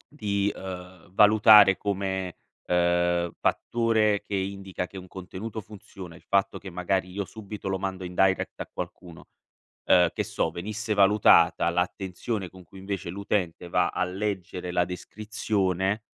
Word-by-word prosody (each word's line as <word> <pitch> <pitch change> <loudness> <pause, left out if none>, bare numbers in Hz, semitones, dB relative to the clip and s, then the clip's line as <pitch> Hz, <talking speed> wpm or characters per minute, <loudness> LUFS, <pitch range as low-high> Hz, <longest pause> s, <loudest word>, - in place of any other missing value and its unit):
di, 100 -6 0
uhm, 90 -2 -9
valutare 105 -1 +7
come, 95 -2 -3 0.3
uhm, 85 -1 +2
fattore 110 -3 +1
che 100 - -5
indica 95 -1 -3
che 95 +2 -10
un 90 - -12
contenuto 95 +5 -7
funziona, 95 -4 -11
il 85 - -15
fatto 100 0 0
che 95 - -9
magari 90 +1 -1
io 100 +1 -3
subito 105 -1 -8
lo 95 0 -1
mando 95 -1 -4
in 90 0 -6
direct 95 +1 +1
a - - -6
qualcuno, 85 -3 -8 0.6
uhm, 90 -2 +5
che - - -1
so, 80 - -2
venisse 105 +5 -3
valutata 100 -3 +5
l'attenzione 95 +3 -3
con 95 0 -14
cui 95 - -16
invece 95 -3 -5
l'utente 95 -2 -2
va 90 0 +2
a - - -1
leggere 90 -2 -4
la 90 -1 +2
descrizione, 100 0 -2
95 Hz, 145 wpm, -26 LUFS, 90-100 Hz, 0.6 s, valutare